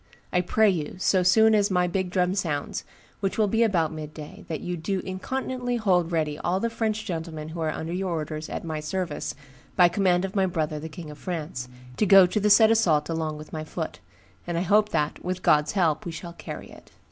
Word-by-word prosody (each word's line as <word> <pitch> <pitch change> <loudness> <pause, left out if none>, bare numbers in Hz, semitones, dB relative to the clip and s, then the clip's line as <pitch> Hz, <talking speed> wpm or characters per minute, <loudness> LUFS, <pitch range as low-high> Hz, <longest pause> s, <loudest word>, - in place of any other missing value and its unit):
I 180 - +3
pray 220 +4 +3
you, 160 -5 -3
so 185 0 +2
soon 220 +5 +5
as 205 -1 +3
my 180 -2 +2
big 180 +1 -1
drum 180 0 +1
sounds, 155 -7 -2 0.4
which 195 -1 -2
will 215 -2 +3
be 225 +3 +1
about 180 -8 +2
midday, 155 -1 -9
that 160 - -3
you 180 - -3
do 185 +4 -2
incontinently 245 +5 -3
hold 180 -7 +2
ready 155 -3 -1
all 180 +2 0
the 230 +3 -1
French 220 -1 -1
gentlemen 160 -4 -5
who 165 +1 -7
are 160 - 0
under 160 +2 -4
your 185 +1 -2
orders 155 -2 -4
at - - -4
my 160 -2 -3
service, 170 0 -3 0.4
by 175 -2 +6
command 180 0 +2
of 195 - -7
my 190 -1 +3
brother 155 -3 -2
the 160 +2 -7
King 160 -2 -9
of 150 - -12
France, 150 -8 -4 0.3
to 210 - +2
go 195 -1 +9
to 180 +4 0
the 210 +1 +2
said 220 +2 +7
assault 165 -10 +3
along 160 -2 -2
with 155 0 -11
my 155 -1 -3
foot; 160 +1 -5 0.5
and 170 -1 -2
I - - +1
hope 210 +3 +3
that, 150 -5 -1
with 185 0 -3
God's 150 0 +3
help 175 -2 +1
we 175 - -5
shall 170 +1 -8
carry - - -8
it. - - -15
180 Hz, 220 wpm, -26 LUFS, 160-195 Hz, 0.5 s, go